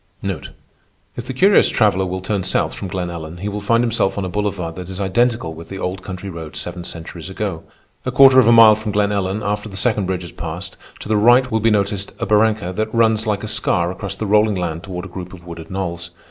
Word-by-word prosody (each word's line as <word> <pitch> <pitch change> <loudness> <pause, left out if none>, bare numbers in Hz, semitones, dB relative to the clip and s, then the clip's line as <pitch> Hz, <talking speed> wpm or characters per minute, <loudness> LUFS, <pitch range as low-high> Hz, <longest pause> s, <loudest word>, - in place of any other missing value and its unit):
If 120 0 -6
the - - -3
curious 195 +8 +5
traveller 100 -5 +2
will 95 +1 -4
turn 100 +1 -1
south 95 0 0
from 95 - -6
Glen 90 -1 -3
Ellen, 80 0 -7
he 100 +4 -5
will 105 0 -4
find 115 +3 +2
himself 115 -5 0
on 100 - -1
a - - -3
boulevard 90 -4 -2
that 90 0 -7
is 95 0 -6
identical 100 -2 +1
with 80 +1 -11
the 95 - -6
old 95 0 -3
country 95 0 -7
road 80 -5 -8
seven 85 +4 -5
centuries 85 +1 -7
ago. 95 -4 -4 0.4
A 130 - -2
quarter 135 0 +7
of 125 - +5
a - - +7
mile 115 -2 +9
from 110 0 -4
Glen 105 0 +2
Ellen, 100 +1 -1
after 105 +1 -2
the 95 - -8
second 105 -4 +1
bridge 90 -1 -2
is 85 - -9
passed, 85 +3 -6 0.3
to - - -7
the 110 0 +2
right 120 +4 +5
will 110 - +2
be 115 +1 +3
noticed 100 -1 0
a - - -2
barranca 105 -3 +2
that 110 0 -1
runs 110 -1 +2
like 105 -1 -1
a - - -3
scar 90 -4 0
across 100 +1 -5
the 110 - -4
rolling 105 0 +3
land 85 -3 -3
toward 90 0 -6
a - - -6
group 90 0 -8
of 90 -2 -13
wooded 85 -1 -9
knolls. 85 -3 -4
100 Hz, 240 wpm, -19 LUFS, 90-110 Hz, 0.4 s, mile